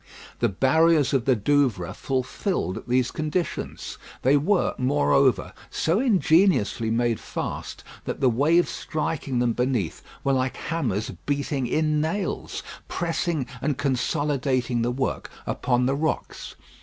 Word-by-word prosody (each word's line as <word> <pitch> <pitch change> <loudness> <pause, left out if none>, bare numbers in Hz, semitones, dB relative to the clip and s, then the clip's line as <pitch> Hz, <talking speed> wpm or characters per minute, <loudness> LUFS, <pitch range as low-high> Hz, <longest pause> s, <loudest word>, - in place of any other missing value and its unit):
The 120 - +2
barriers 150 - +3
of 130 -3 +2
the 130 - +4
Douvres 110 - +1
fulfilled 130 - -2
these 125 0 +2
conditions. 155 +3 -3 0.2
They 135 +3 +5
were, 175 +7 +2
moreover, 125 - +2 0.2
so 165 +6 +1
ingeniously 175 - +3
made 115 0 +1
fast, - - -5 0.2
that - - -3
the 135 - +3
waves 150 +9 +3
striking 150 -4 -3
them 120 -1 +2
beneath 125 -9 -1 0.2
were 135 - +2
like 130 -1 0
hammers 125 - -2 0.2
beating 140 -2 -1
in 155 +2 +1
nails, 175 +6 -2 0.2
pressing 165 -4 -1 0.2
and 145 -2 0
consolidating 130 -2 0
the 120 - +1
work 130 +2 -2 0.2
upon 125 0 +1
the 135 - +2
rocks. 155 +2 -3
135 Hz, 125 wpm, -25 LUFS, 125-155 Hz, 0.2 s, They